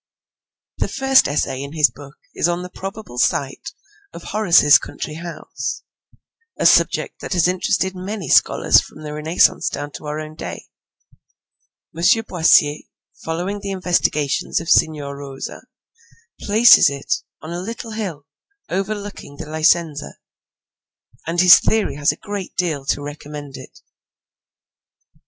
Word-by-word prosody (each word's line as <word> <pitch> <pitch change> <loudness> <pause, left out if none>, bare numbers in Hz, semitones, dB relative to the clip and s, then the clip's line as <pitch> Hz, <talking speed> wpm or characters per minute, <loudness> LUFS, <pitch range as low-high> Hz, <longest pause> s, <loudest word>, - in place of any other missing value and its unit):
The - - 0
first 270 0 +3
essay 135 -2 -2
in 140 +1 -7
his 155 -2 +3
book 140 0 -13 0.2
is - - +1
on 175 +1 -2
the 180 - -9
probable 195 - -7
site 140 - -1 0.4
of - - -10
Horace's 170 -8 +5
country 155 - -7
house, 170 +2 -6 0.7
a - - -2
subject - - +3
that - - -4
has 175 -2 +3
interested 185 +1 0
many 190 -1 -6
scholars - - +4
from 155 - -13
the 150 -1 -6
Renaissance 155 +3 +2
down 145 0 -6
to 150 - -9
our 150 +1 -3
own 155 0 -8
day. - - -8 1.3
M. 165 - -6 0.3
Boissier, 155 -3 +3 0.4
following 180 +5 -3
the 200 0 -6
investigations 175 -6 0
of 165 +1 -7
Signor 145 -3 +2
Rosa, 140 -1 -8 0.8
places 220 - +6
it 460 - -3 0.2
on 160 - -9
a 175 - -4
little 225 +3 -7
hill 190 -10 -5 0.4
over 195 +3 -2
looking 200 -8 -9
the - - -7
Licenza, 155 -1 0 1.1
and 170 +1 +1
his 180 -1 +9
theory 220 -1 0
has 145 +1 +2
a - - -8
great 205 -3 -7
deal 160 -7 -2
to 145 - -1
recommend 145 -1 -8
it. - - -13
165 Hz, 140 wpm, -20 LUFS, 145-195 Hz, 1.3 s, his